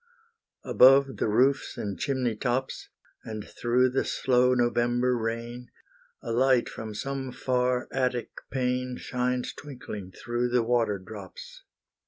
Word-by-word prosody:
Above 135 +1 +5
the - - 0
roofs 130 +6 +2
and 100 -4 -4
chimney 130 -5 0
tops, 125 +3 -2 0.3
And 110 -2 -6
through 125 +1 +1
the 135 - +1
slow 125 0 +2
November 120 +1 +2
rain, 115 +1 -4 0.5
A 115 - -4
light 130 +1 +3
from 110 -1 -7
some 135 +2 -4
far 125 0 0
attic 125 -2 -1 0.2
pane, 125 -1 -1
Shines 125 0 -2
twinkling 110 -9 -8
through 120 +5 -2
the 120 -1 +2
water 115 -3 +1
drops. 95 0 -11
125 Hz, 125 wpm, -27 LUFS, 115-125 Hz, 0.5 s, Above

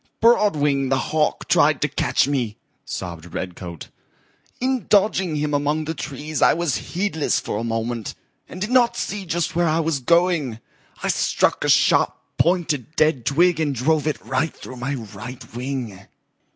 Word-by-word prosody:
"Broadwing 150 - +3
the 135 - +2
Hawk 155 +3 0
tried - - +4
to - - +3
catch - - +1
me," 125 -7 -1 0.3
sobbed 85 -2 -6
Redcoat. 90 -2 -6 0.7
"In 255 -3 -1
dodging 190 -5 +3
him 150 0 -1
among 145 +2 0
the 160 - -2
trees 150 +1 -5
I - - +5
was 170 -5 0 0.2
heedless 180 -6 +1
for - - -4
a - - -3
moment 115 0 -3 0.3
and 180 - -8
did 210 +5 -3
not 245 -2 +4
see 200 -2 -4
just 170 -1 -1
where 175 0 +2
I 160 +1 +2
was 160 -3 0
going. 165 -5 +2 0.4
I - - 0
struck - - +1
a - - 0
sharp - - +4 0.2
pointed 165 -5 +1
dead 155 -6 +2
twig 170 +3 +3
and 145 -3 0
drove 150 +5 +1
it 155 - -1
right 135 +4 -1
through 130 - -10
my 135 +4 -2
right 115 +1 -9
wing." 125 -6 -4
150 Hz, 165 wpm, -22 LUFS, 125-170 Hz, 0.7 s, I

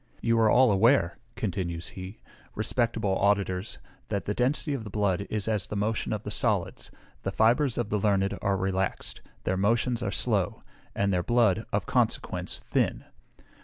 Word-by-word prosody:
You 115 0 +2
are 110 -1 +5
all 125 +1 +5
aware," 100 -2 +3 0.2
continues 85 -4 -3
he, 95 +2 -9 0.3
"respectable 115 -5 0
auditors, 100 -1 +1 0.3
that 100 -4 -2
the 105 - -1
density 135 +5 +1
of 130 -5 -3
the 105 - -7
blood 100 -1 0
is 105 -1 -2
as 105 -4 0
the - - -5
motion 105 +2 -1
of 105 -1 -2
the - - -5
solids; - - -1 0.3
the - - -2
fibres 120 +6 +3
of 120 -3 -1
the 105 - +1
learned 100 -1 +1
are 100 -1 +1
relaxed, 95 0 -2 0.2
their 95 - 0
motions 115 +4 +1
are - - -1
slow, 100 -7 0 0.3
and 100 -1 +1
their 90 - +2
blood, 110 0 +2
of - - 0
consequence, - - 0
thin. - - +1
105 Hz, 165 wpm, -28 LUFS, 95-115 Hz, 0.3 s, are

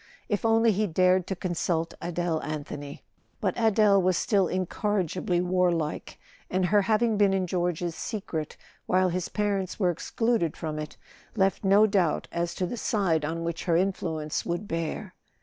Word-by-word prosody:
If 205 - -1
only 225 0 +4
he 210 +1 0
dared 185 +1 +3
to 190 - -2
consult 170 -2 -1
Adele 175 -2 -1
Anthony! 145 -1 -6 0.4
But - - 0
Adele 215 -3 +4
was 185 -1 +2
still 195 -4 +2
incorrigibly 185 -1 -1
warlike, 175 -4 0 0.3
and 185 0 +1
her 205 +3 +4
having 215 +2 +2
been 200 -2 +4
in 190 -1 0
George's 175 -1 -1
secret 180 -7 -5 0.3
while 185 0 +3
his 180 0 -2
parents 200 -3 -1
were 180 -3 +3
excluded 220 0 -1
from 155 -2 -4
it 150 -1 -7 0.4
left 195 -1 +1
no 200 +2 +6
doubt 195 -6 +1
as 170 0 -2
to 185 - -1
the 240 - -4
side 190 -9 +1
on 165 +2 -3
which 170 -1 -4
her 170 -2 +3
influence 160 -5 -1
would 175 +4 -3
bear. 165 +3 -3
185 Hz, 160 wpm, -27 LUFS, 165-200 Hz, 0.4 s, no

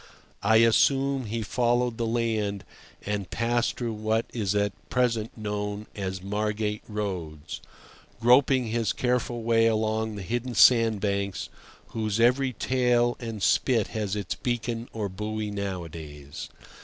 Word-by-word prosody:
I 110 +2 +4
assume 135 +4 +4
he 115 +1 -2
followed 120 +1 +1
the 115 - 0
land 110 -4 -1 0.4
and 100 -2 -2
passed 120 +1 0
through 120 -2 -2
what 110 +1 0
is 105 -4 -1
at 100 -1 +1 0.2
present 115 -3 0
known 105 -1 -3
as 95 -2 -4
Margate 105 +1 -1
Roads, 90 -8 -5 0.6
groping 125 +1 +4
his 115 -1 0
careful 125 -1 -1
way 115 0 +4
along 110 0 0
the 100 - -6
hidden 120 +5 -3
sandbanks, 105 -5 +3 0.4
whose 110 -1 -2
every 130 +3 +4
tail 120 -1 +2
and 115 -5 -5
spit 115 0 +3
has 105 -2 -2
its 100 -4 -2
beacon 120 -1 -3
or 110 -2 -3
buoy 105 +2 -4
nowadays. 80 -8 -6
110 Hz, 130 wpm, -27 LUFS, 100-120 Hz, 0.6 s, I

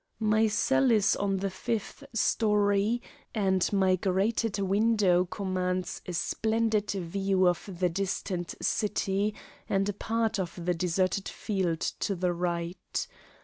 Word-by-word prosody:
My 215 0 +3
cell 220 +5 +2
is 215 -3 +4
on 195 -1 0
the 195 0 -2
fifth 230 +6 -4
story, 210 +1 +2 0.3
and 190 -3 +2
my 190 -2 +3
grated 200 +4 0
window 200 -2 +3
commands 185 -1 -2
a 180 - -4
splendid 220 +6 0
view 190 0 +1
of 175 +3 0
the 180 - +3
distant 180 -1 -3
city 205 0 0 0.3
and 195 0 +1
a - - -1
part 225 +1 -1
of 175 -1 -4
the 180 - +2
deserted 185 +3 0
field 185 -6 -2 0.2
to 200 - -1
the 180 0 0
right. 170 0 -3
195 Hz, 130 wpm, -29 LUFS, 180-210 Hz, 0.3 s, is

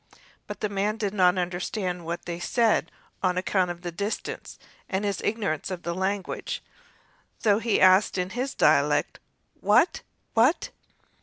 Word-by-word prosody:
But - - -7
the 210 - +1
man 205 +2 -1
did 205 -2 -2
not 185 -2 +4
understand 180 0 -2
what 170 +1 -4
they 170 -1 -4
said 225 +5 +1 0.3
on 180 -1 +1
account 185 0 +1
of 175 0 -6
the 175 - -3
distance 200 +5 -4 0.3
and 190 +2 -1
his 200 -1 -1
ignorance 205 -9 -1
of 180 -2 -5
their 170 - -2
language, 190 +2 -3 0.7
and - - -26
so 210 -2 +4
he 225 -1 +1
asked 185 +2 +5
in 180 +1 -2
his 255 +4 -3
dialect: - - +3 0.4
"Wat? - - +3 0.3
wat?" 245 +9 +3
190 Hz, 155 wpm, -26 LUFS, 180-210 Hz, 0.7 s, asked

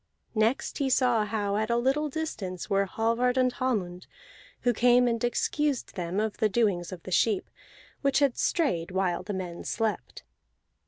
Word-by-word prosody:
Next 225 +7 0
he 275 -2 +1
saw 245 -4 +3
how 205 -1 -1
at 220 +1 -1
a 235 - +2
little 270 +5 +1
distance 220 - -4
were 195 0 +3
Hallvard 230 +5 +1
and 255 -1 +3
Hallmund, 190 -10 -2 0.5
who 245 - +2
came 245 +2 +4
and 230 -1 -1
excused 280 +3 0
them 180 +1 -3
of 215 -1 -1
the 215 -2 +2
doings 195 -6 +1
of 180 -3 -8
the 185 - -8
sheep, 205 +3 +2 0.5
which 275 -2 +2
had 280 -4 +3
strayed 180 - 0
while 185 -2 0
the 205 - -6
men 180 -3 -5
slept. 225 -2 -3
225 Hz, 165 wpm, -28 LUFS, 190-250 Hz, 0.5 s, came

